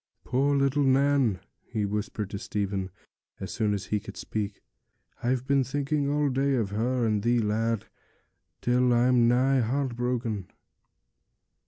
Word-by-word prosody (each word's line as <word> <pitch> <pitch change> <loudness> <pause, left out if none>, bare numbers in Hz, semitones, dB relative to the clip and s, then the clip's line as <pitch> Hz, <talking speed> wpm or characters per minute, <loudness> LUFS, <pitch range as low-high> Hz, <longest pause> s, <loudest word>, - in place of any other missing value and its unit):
'Poor 140 +3 +1
little 140 +1 +2
Nan!' 135 -6 +3 0.2
he 105 -2 -2
whispered 105 0 -3
to 100 - -4
Stephen, 100 -2 -2 0.5
as 95 - -5
soon 110 -3 0
as 100 -2 -2
he 105 - +3
could - - -10
speak. 105 -2 -4 0.6
'I've 125 +1 0
been 140 0 +3
thinking 140 +2 -1
all 145 0 +1
day 135 +1 +1
of 110 -5 -1
her 120 +3 0
and 105 -2 +1
thee, 120 +3 +2
lad, 115 0 0 0.8
till 125 0 +3
I'm 120 0 +4
nigh 130 +3 +3
heart 130 +2 -1
broken.' 120 -5 -2
120 Hz, 145 wpm, -27 LUFS, 105-135 Hz, 0.8 s, I'm